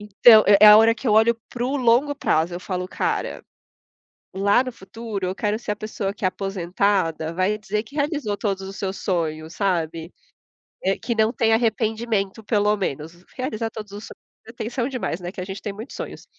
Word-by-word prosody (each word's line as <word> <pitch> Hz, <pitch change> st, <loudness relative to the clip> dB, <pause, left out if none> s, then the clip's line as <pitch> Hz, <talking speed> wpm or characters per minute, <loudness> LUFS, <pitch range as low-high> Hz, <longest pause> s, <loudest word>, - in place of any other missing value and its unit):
Então, 215 Hz, +2 st, +6 dB
é 200 Hz, 0 st, +7 dB
é -, -, +11 dB
a 210 Hz, -, +10 dB
hora 225 Hz, +1 st, +5 dB
que 245 Hz, -, -8 dB
eu 210 Hz, -, +3 dB
olho 225 Hz, +2 st, +5 dB, 0.2 s
para 245 Hz, -, -5 dB
o 265 Hz, +3 st, 0 dB
longo 255 Hz, +3 st, +3 dB
prazo. 175 Hz, -, 0 dB
Eu 175 Hz, -, -5 dB
falo: 180 Hz, -1 st, -4 dB
"Cara, -, -, -2 dB, 0.9 s
lá 200 Hz, +5 st, +3 dB
no 255 Hz, -, -5 dB
futuro, 220 Hz, -1 st, -6 dB
eu 185 Hz, +1 st, -3 dB
quero 210 Hz, +1 st, -1 dB
ser 220 Hz, -, -4 dB
a -, -, -2 dB
pessoa 205 Hz, -2 st, -4 dB
que 205 Hz, -, -4 dB
é -, -, +5 dB
aposentada, 185 Hz, -3 st, -1 dB
vai 190 Hz, +4 st, 0 dB
dizer 210 Hz, 0 st, -2 dB
que 275 Hz, +6 st, -15 dB
realizou 285 Hz, -8 st, -1 dB
todos 195 Hz, -2 st, -2 dB
os 195 Hz, -, -8 dB
seus 195 Hz, -1 st, -3 dB
sonhos", 160 Hz, -3 st, -3 dB
sabe. 170 Hz, -4 st, -2 dB, 0.7 s
Eh, 195 Hz, +1 st, +1 dB
que 240 Hz, -, -3 dB
não 220 Hz, 0 st, +2 dB
tem 225 Hz, -2 st, +2 dB
arrependimento 220 Hz, -2 st, 0 dB
pelo 210 Hz, -1 st, +2 dB
menos. 170 Hz, -2 st, -5 dB
Realizar 230 Hz, -4 st, -3 dB
todos 210 Hz, -2 st, -9 dB
os 205 Hz, +2 st, -8 dB
sonhos -, -, -13 dB, 0.3 s
é -, -, -9 dB
tensão 235 Hz, +2 st, -3 dB
demais, 245 Hz, -9 st, -3 dB
né, 175 Hz, 0 st, -6 dB
que 190 Hz, -, -7 dB
a -, -, -4 dB
gente 195 Hz, +1 st, -7 dB
tem 205 Hz, -3 st, -4 dB
muitos 220 Hz, +6 st, -9 dB
sonhos. -, -, -7 dB
210 Hz, 205 wpm, -23 LUFS, 190-225 Hz, 0.9 s, é